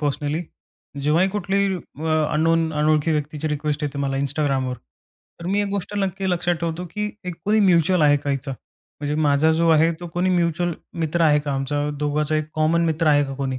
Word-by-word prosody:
Personally, 150 +2 -1 0.6
जेव्हाही 165 +6 +3
कुठलीही 200 -1 0
अ, 155 -2 -2
unknown 165 +1 +2
अनोळखी 150 +1 +2
व्यक्तीची 150 +1 -2
रिक्वेस्ट 150 0 -2
येते 145 -1 -3
मला 135 -1 -1
Instagramवर. 135 -2 0 0.7
तर 170 - -6
मी 200 +2 +1
एक 205 - -2
गोष्ट 200 +1 -4
नक्की 195 -1 -1
लक्षात 175 0 +1
ठेवतो, 170 +1 -3
की 210 +1 -3
एक 180 -1 -4
कोणी 215 +1 +3
म्युच्युअल 180 -2 +4
आहे 145 -1 +5
का 145 0 -3
याचा? 135 0 -3 0.5
म्हणजे 145 0 -2
माझा 145 +2 +3
जो 165 +1 +2
आहे 160 +1 +5
तो 175 - -6
कोणी 180 +1 +1
म्युच्युअल 175 0 +1 0.3
मित्र 165 +1 -1
आहे 150 -2 +5
का 145 -1 -3
आमचा 145 +2 -1
दोघांचा 150 +1 0
एक 155 - 0
कॉमन 160 +2 +2
मित्र 160 0 0
आहे 145 -1 +4
का 135 0 -6
कोणी? 130 -1 -3
155 Hz, 190 wpm, -22 LUFS, 145-175 Hz, 0.7 s, आहे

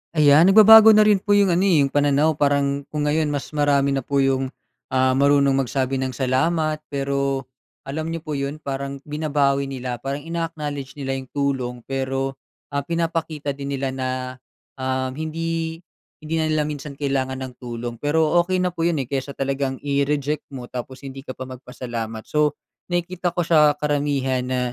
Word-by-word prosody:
Ayan 150 +3 +6
nagbabago 220 +2 +9
na 215 - +7
rin 210 -2 +4
po 205 +1 +2
yung 200 -2 +4
ano, 180 +3 +2
eh, 160 -7 +4
yung 135 - -1
pananaw. 145 +1 +2
Parang 140 -1 +1
kung 150 -1 -3
ngayon 150 +1 +1
mas 145 -1 -3
marami 145 -2 +2
na 135 - +1
po 140 +2 0
yung, 135 0 +1 0.4
ah, 130 0 +2
marunong 140 +1 +4
magsabi 135 0 0
ng 130 -1 -3
salamat. 155 +4 +1
Pero 140 -1 -1 0.4
alam 155 +3 -3
niyo 165 -1 -4
po 155 - -6
'yon, 140 +2 -3
parang 140 0 -4
binabawi 145 -2 0
nila. 125 -3 -5
Parang 140 +1 -4
ina-acknowledge 155 -5 -4
nila 135 -2 -3
yung 130 -1 -6
tulong, 135 -3 -1
pero, 135 0 -2 0.4
ah, 140 -1 -1
pinapakita 165 -3 -2
din 140 0 -6
nila 135 0 -2
na, 130 -1 -3 0.7
um, 130 0 -1
hindi, 165 +2 -3 0.4
hindi 160 +1 -3
na 155 - +1
nila 155 -1 +1
minsan 145 -1 -6
kailangan 135 -2 -1
ng 130 - -7
tulong. 120 -1 -5
Pero 155 +1 +1
okey 185 +1 -1
na 180 - 0
po 165 -1 -1
'yon, 160 -4 0
eh, 120 - -12
kaysa 135 +1 -3
talagang 135 0 -1
i-reject 140 +1 -1
mo 125 -1 -7
tapos 130 +2 -7
hindi 135 0 -7
ka 130 - -7
pa 130 - -6
magpasalamat. 120 -3 -6
So, 150 -1 +1 0.4
nakikita 175 0 -1
ko 175 - +1
siya 150 -3 +4
karamihan 140 -3 0
na 130 0 -1
140 Hz, 175 wpm, -22 LUFS, 135-155 Hz, 0.7 s, nagbabago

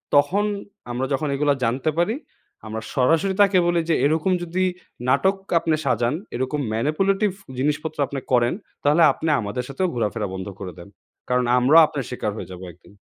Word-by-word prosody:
তখন 170 +9 +3 0.5
আমরা 125 +2 -1
যখন 150 +3 -1
এগুলো 145 0 +2
জানতে 125 +6 0
পারি, 190 +7 +1 0.5
আমরা 110 +1 -4
সরাসরি 165 +9 +3
তাকে 195 -1 +5
বলি 175 -1 +2
যে, 165 - +4
এরকম 160 +5 +2
যদি 175 +2 -1 0.5
নাটক 190 +9 +3 0.2
আপনে 160 -1 +1
সাজান, 120 0 +1 0.2
এরকম 130 +4 -2
manipulative 195 - +1 0.2
জিনিসপত্র 150 +3 -1
আপনি 140 - -4
করেন, 120 -1 +3 0.3
তাহলে 150 +4 +4
আপনি 160 - -3
আমাদের 105 +5 -3
সাথেও 185 +7 -1
ঘোরাফেরা 110 -2 -1
বন্ধ 95 +1 -5
করে 95 -2 -6
দেন। 85 - -11 0.4
কারন, 125 0 +2
আমরাও 150 +7 +7
আপনার 140 -3 -4
শিকার 120 -4 -3
হয়ে 105 - -7
যাবো 90 0 -9
একদিন। 90 +4 -20
145 Hz, 165 wpm, -23 LUFS, 120-165 Hz, 0.5 s, আমরাও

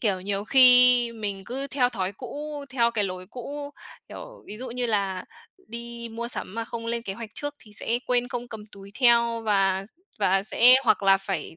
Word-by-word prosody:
kiểu, 200 -5 -1
nhiều 200 +1 -4
khi 250 -1 +7
mình 205 -4 -6
cứ 270 +5 -4
theo 255 -3 +1
thói 195 -5 -4
cũ, 295 +6 -8
theo 235 -3 +1
cái 220 -3 -1
lối 185 -1 -7
cũ, 285 +4 -8 0.4
kiểu, - - -12
ví 210 - -9
dụ 255 +1 -7
như 245 +1 -2
là 195 -4 -2 0.4
đi 235 0 -7
mua 235 +1 -5
sắm 195 - -8
mà 230 0 -4
không 230 0 -8
lên 235 0 -3
kế 195 - -6
hoạch 230 0 -9
trước 290 0 -5
thì 210 - -19
sẽ 235 +1 -1
quên 245 -1 0
không 245 0 -6
cầm 215 -2 -10
túi 200 0 -14
theo 235 -2 +3
và 195 -2 0
s - - -22 0.3
và 195 -1 +1
sẽ 240 +4 +5
hoặc 215 -3 +2
là 195 0 +5
phải 195 -5 -6
230 Hz, 210 wpm, -24 LUFS, 200-245 Hz, 0.4 s, khi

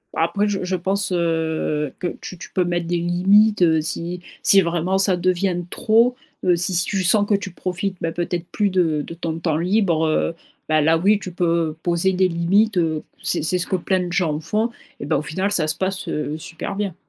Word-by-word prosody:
Après 170 +6 +1
je 195 -2 -2
je 185 +1 -1
pense, 195 +2 -1
heu, 160 -4 -1
que 180 - -2
tu 185 - -8
tu - - -10
peux 185 - +1
mettre 175 -1 -2
des 175 0 0
limites, 190 +5 +3
heu, 160 -2 +4
si 170 +3 -4 0.2
si 195 - +6
vraiment 175 +2 0
ça 195 -1 +2
devient 185 +1 +1
de 175 0 -4
trop, 235 +4 +3 0.3
heu, 180 -1 +4
si 180 +3 -1
si 175 0 +2
tu 195 -2 -1
sens 205 +3 +3
que 205 - +3
tu 195 -1 -4
profites 185 +2 -3
bah, 165 - -1
peut-être 175 0 -3
plus 205 -1 +1
de 170 -5 +1
de - - -8
ton 165 -1 -4
temps 160 -2 0
libre, 175 -2 +1
heu, 160 +1 0 0.3
bah, 155 0 +3
là 160 +2 +4
oui 200 +5 +3
tu 185 - -7
peux 170 -3 0
poser 175 +2 +1
des 185 0 +2
limites, 190 +5 +2
heu, 160 -3 0 0.2
c'est - - -1
c'est 170 +3 +1
ce 180 - -3
que - - 0
plein 185 +1 0
de 175 - -5
gens 165 -5 0
font 210 +9 -1 0.3
et - - -4
bah, 150 +1 +1
au - - -1
final 185 +7 -2
ça 165 -6 +2
se 155 - +1
passe, 190 0 -3
heu, 150 0 -3
super 170 +4 -6
bien. 200 -4 -3
175 Hz, 225 wpm, -21 LUFS, 165-195 Hz, 0.3 s, si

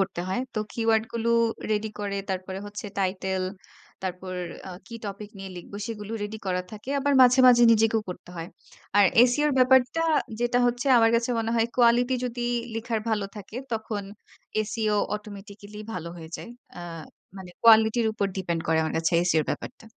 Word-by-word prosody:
করতে 190 -2 -1
হয়। 190 +6 -1
তো 215 - -1
কিওয়ার্ড 225 -1 +2
গুলো 230 0 -1 0.4
রেডি 215 0 0
করে। 200 -1 -2
তারপরে 190 0 -4
হচ্ছে 210 +1 -7
টাইটেল, 190 0 -1 0.6
তারপর 185 0 -5 0.3
আ - - -6 0.2
কি 230 - -10
টপিক 205 +1 -6
নিয়ে 195 0 -7
লিখব, 175 - -10
সেগুলো 215 -1 -6
রেডি 210 +1 -5
করা 180 0 0
থাকে। 215 +5 -8
আবার 285 +1 +1
মাঝে, 250 +1 +6
মাঝে 240 -1 +6
নিজেকেও 225 0 +3
করতে 180 - -10
হয়। 165 0 -5 0.5
আর 205 - +7 0.2
SEO 295 +5 +1
র - - 0
ব্যাপারটা, 260 +4 +4 0.4
যেটা 240 0 +2
হচ্ছে 245 +2 -1
আমার 225 0 +5
কাছে 235 +1 -1
মনে 225 0 -1
হয় 225 0 +3
কোয়ালিটি 245 +1 +4
যদি 245 0 -3 0.3
লিখার 225 0 -2
ভালো 215 -2 0
থাকে, 205 +2 -9 0.2
তখন 220 -2 -3 0.7
SEO 215 -2 0 0.2
অটোমেটিক্যালি 205 0 -9
ভালো 170 -4 -5
হয়ে 160 -2 -9
যায়। 235 - -9 0.3
আ - - -6 0.6
মানে 190 -2 -9
কোয়ালিটির 225 0 +6
উপর 210 -2 -1
ডিপেন্ড 175 -3 -2
করে 160 0 +3
আমার 160 - -2
কাছে 165 +1 0 0.2
SEO 160 -2 +3
র - - -9
ব্যাপারটা। 225 - -6
215 Hz, 175 wpm, -26 LUFS, 190-230 Hz, 0.7 s, আর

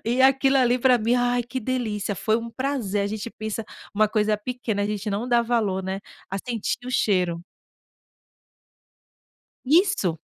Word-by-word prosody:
E 245 +3 +2
aquilo 270 +1 +4
ali 250 -1 +3
para 250 0 +4
mim, 230 +2 +1
ai, 245 0 +2
que 245 +2 -5
delícia, 220 -5 -2
foi 220 +4 +1
um 230 0 -5
prazer, 240 -6 -1
a 200 - 0
gente 215 +2 -4
pensa: 220 0 -5 0.3
"Uma 215 +1 +3
coisa 215 0 +1
pequena", 220 -1 -3
a - - 0
gente 210 0 -3
não 215 +5 -2
dá 240 -1 +4
valor, 220 -5 0
né, 190 +1 -3 0.3
a 195 - -2
sentir 230 0 -2
o - - -4
cheiro. 180 -8 +1 2.2
Isso. 285 - +3
225 Hz, 165 wpm, -24 LUFS, 205-250 Hz, 2.2 s, aquilo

